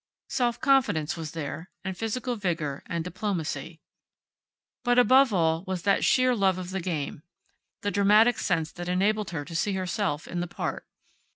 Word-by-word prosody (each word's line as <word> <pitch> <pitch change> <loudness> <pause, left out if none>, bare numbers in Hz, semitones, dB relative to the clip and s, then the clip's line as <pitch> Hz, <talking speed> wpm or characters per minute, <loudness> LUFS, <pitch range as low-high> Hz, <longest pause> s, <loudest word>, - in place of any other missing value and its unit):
Self 240 -1 0
confidence 265 - +2
was 160 -3 -6
there, 160 +2 -5
and 190 -1 -4
physical 240 +4 -2
vigor, 165 -9 -2
and 170 -1 -2
diplomacy. 180 -2 -4 1.0
But 245 0 +2
above 255 +1 +6
all 165 -4 +2
there 180 - -15
was 185 -2 -3
that 200 -1 +2
sheer 255 -1 +4
love 190 -4 +2
of 185 0 -6
the 190 -1 -2
game; 155 -5 -3 0.6
the 205 - -1
dramatic 210 +4 +4
sense 165 -4 0
that 175 0 -6
enabled 205 +3 +1
her 155 -4 -4
to 165 - -8
see 200 +4 0
herself 185 -4 -2
in 175 - -4
the 175 - -2
part. - - -4
185 Hz, 170 wpm, -27 LUFS, 165-215 Hz, 1.0 s, above